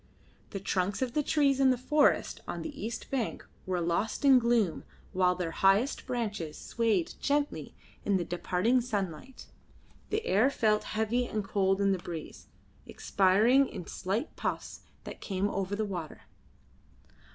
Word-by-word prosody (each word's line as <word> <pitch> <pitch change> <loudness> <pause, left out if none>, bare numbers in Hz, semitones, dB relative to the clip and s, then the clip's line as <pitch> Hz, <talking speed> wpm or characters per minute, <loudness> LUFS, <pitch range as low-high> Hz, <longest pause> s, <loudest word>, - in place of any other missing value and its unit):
The 195 - -5
trunks 195 +3 -1
of 245 -2 -3
the 300 - +2
trees 280 -2 +2
in 270 -1 +5
the 255 - +3
forest 295 +4 +2
on - - -4
the 295 -7 -7
east 225 +1 -6
bank 255 -5 -2 0.2
were 185 -1 0
lost 175 - -1
in 265 -2 +8
gloom 235 -7 +1 0.3
while 180 -1 +3
their 175 -2 -3
highest 200 - +2
branches 210 -10 -3
swayed 220 -7 0
gently 290 +1 -1 0.3
in 200 -2 +2
the 175 - -2
departing 185 +8 +1
sunlight. 210 0 -4 0.6
The 430 +1 -1
air 215 +8 +4
felt 215 -6 +1
heavy 230 +3 +1
and 215 -3 -2
cold 195 -1 +1
in 200 -1 +3
the 190 - 0
breeze, 170 -2 -8 0.4
expiring 215 +8 +3
in 175 - -7
slight 205 - -3
puffs - - -4 0.2
that - - -9
came 195 0 -1
over 195 0 -2
the 215 +1 -1
water. 175 -6 -6
210 Hz, 150 wpm, -30 LUFS, 185-250 Hz, 0.6 s, in